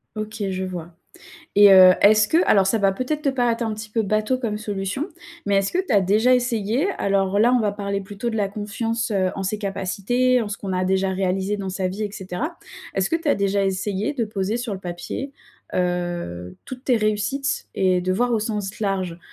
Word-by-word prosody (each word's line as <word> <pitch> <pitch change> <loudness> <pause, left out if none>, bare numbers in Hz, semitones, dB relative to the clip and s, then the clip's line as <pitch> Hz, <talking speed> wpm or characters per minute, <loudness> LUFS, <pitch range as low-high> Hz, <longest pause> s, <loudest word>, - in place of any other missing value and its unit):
OK, 215 0 -5
je 190 0 -3
vois 175 -2 -6 0.6
et 205 0 +8
heu, 185 -1 +9
est-ce 210 0 +6
que 320 - +3
alors 195 -2 +5
ça 220 +4 +1
va 195 -1 +3
peut-être 255 +9 -3
te 290 - +1
paraître 245 -3 0
un 225 - -1
petit 215 0 -8
peu 225 - +1
bateau 215 +4 0
comme 220 -4 -2
solution 205 - -3 0.4
mais 200 -1 +2
est-ce 195 0 0
que - - -1
tu 260 - -1
as 200 - +5
déjà 215 +7 +3
essayé 245 - +1
alors 195 0 +1
là, 235 +4 +4
on 250 - +4
va 210 -3 +1
parler 200 -1 -3
plutôt 205 +4 -5
de - - -4
la 205 -2 +1
confiance, 220 +3 -3
heu, 190 -2 +1
en 195 - -3
ses 205 +3 -2
capacités, 205 +6 0
en 220 - -3
ce 210 - -4
qu'on 195 -4 -4
a 185 0 0
déjà 190 +1 +1
réalisé 190 +1 -1
dans 195 -1 -4
sa 185 0 -2
vie 190 +4 -5
et 205 - -3
cetera. 205 - -5 0.4
Est-ce 195 0 +1
que - - +3
tu 330 -1 -4
as - - +4
déjà 200 0 +1
essayé 195 +5 -1
de 240 -5 -1
poser 210 +1 -2
sur 240 -3 -4
le 190 - -6
papier, 180 +9 -5 0.4
heu, 175 - -2
toutes 255 0 -8
tes 250 -3 +3
réussites 215 +6 -1
et 185 -1 +2
de 185 +1 -1
voir 245 +6 +1
au 230 - +2
sens 210 -2 -4
large? 190 -5 -2
205 Hz, 220 wpm, -22 LUFS, 190-230 Hz, 0.6 s, heu